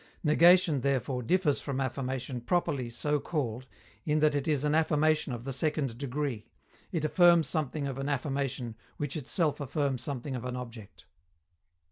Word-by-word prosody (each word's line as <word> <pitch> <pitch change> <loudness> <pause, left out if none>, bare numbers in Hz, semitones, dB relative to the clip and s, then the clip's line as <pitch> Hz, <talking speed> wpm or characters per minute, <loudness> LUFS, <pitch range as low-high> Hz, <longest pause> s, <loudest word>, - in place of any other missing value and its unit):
_Negation, 170 -1 +5
therefore, 130 -1 0
differs 155 +3 +1
from 135 -2 -3
affirmation 130 -1 -3
properly 135 -4 0
so 150 +5 0
called 130 -6 -3 0.4
in 150 0 +1
that 155 -1 +3
it 145 0 -1
is 150 -2 +1
an 150 - +2
affirmation 155 -2 +2
of 120 -1 -5
the 135 +1 -4
second 140 -2 -1
degree: 135 -4 -3 0.4
it 160 -3 -1
affirms 170 -1 +5
something 150 -1 -2
of 135 -1 -4
an 135 +1 -2
affirmation 135 -4 -2 0.2
which 145 -1 -3
itself 150 +1 0
affirms 140 -2 -1
something 135 0 -4
of 125 - -5
an 125 0 -4
object. 115 -5 -9
140 Hz, 155 wpm, -30 LUFS, 125-150 Hz, 0.4 s, Negation